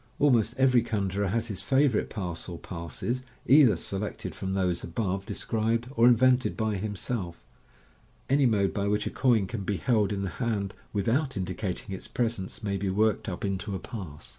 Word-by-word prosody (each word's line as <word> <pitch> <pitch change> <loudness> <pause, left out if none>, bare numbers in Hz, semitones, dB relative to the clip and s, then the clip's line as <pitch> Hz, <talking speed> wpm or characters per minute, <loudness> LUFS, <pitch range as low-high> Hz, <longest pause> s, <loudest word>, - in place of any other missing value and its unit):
Almost 120 -5 +3
every 130 -2 +5
conjuror 100 -3 -1
has 115 +4 0
his 100 -5 -5
favourite 130 +3 +2
pass 90 -4 -5
or 85 - -6
passes, 85 - -4 0.2
either 135 -6 +7
selected 100 +4 -3
from 95 0 -3
those 90 -3 0
above 95 +1 -2
de - - -4 2.9
Any 140 +1 +3
mode 100 -4 +2
by 100 -1 -1
which 105 +1 +1
a - - -2
coin 120 -7 +3
can 110 +2 -5
be 100 0 -1
held 105 -4 +2
in 100 -1 -2
the 95 - -2
hand 105 -5 -1 0.2
without 120 +6 0
indicating 95 +1 -3
its 95 - -7
presence 115 -6 -2
may 100 -1 -1
be 95 0 -1
worktd 105 +2 +1
up 90 +2 -4
into 100 +1 -2
a - - -3
pass. 90 -9 -8
100 Hz, 160 wpm, -28 LUFS, 95-115 Hz, 2.9 s, either